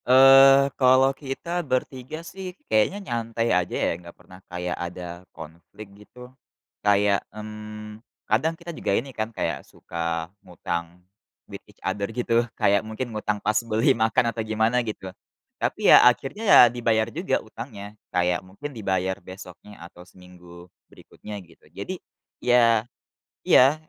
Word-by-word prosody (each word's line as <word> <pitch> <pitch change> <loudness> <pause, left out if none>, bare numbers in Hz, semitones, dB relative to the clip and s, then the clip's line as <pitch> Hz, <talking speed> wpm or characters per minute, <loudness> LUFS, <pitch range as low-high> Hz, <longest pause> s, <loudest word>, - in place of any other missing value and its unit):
Eee, 135 +1 +7
kalau 130 +1 +5
kita 150 +6 -4
ber-3 130 +2 -4
sih 185 +1 -8
kayaknya 110 - +2
nyantai 115 -2 -1
aja 90 -1 0
ya, - - 0
enggak 85 -1 -14
pernah 90 +1 -16
kayak 90 0 -4
ada 85 0 -7
konflik 85 +6 -12
gitu. 125 +5 -15 0.5
Kayak, 100 -1 +3
mmm, 105 0 -9 0.2
kadang 160 +10 0
kita 170 0 -8
juga 100 - -1
ini 135 +2 -4
kan 110 -1 -3
kayak 115 - -3
suka 85 -1 -5 0.2
ngutang 85 0 -6 0.4
with - - -10
each - - -20
other 100 0 -2
gitu, 115 0 +1 0.2
kayak 100 0 +3
mungkin 110 +2 -6
ngutang 105 -1 -2
pas 105 - +2
beli 115 +4 +2
makan 110 0 +1
atau 115 - -3
gimana 110 +3 +1
gitu. 105 -5 -6 0.5
Tapi - - +3
ya - - +9
akhirnya 135 - -4
ya - - +9
dibayar 115 -2 +1
juga 170 +5 0
utangnya, 110 -3 -9 0.2
kayak 90 0 0
mungkin 100 +11 -9
dibayar 95 -4 -1
besoknya 95 +1 -12
atau 90 0 -14
seminggu 90 -1 -15 0.2
berikutnya, 105 -1 -11
gitu. 85 - -23
Jadi - - -7 0.4
ya 120 -2 +3 0.5
iya, 135 +4 +6
110 Hz, 140 wpm, -24 LUFS, 95-125 Hz, 0.5 s, ya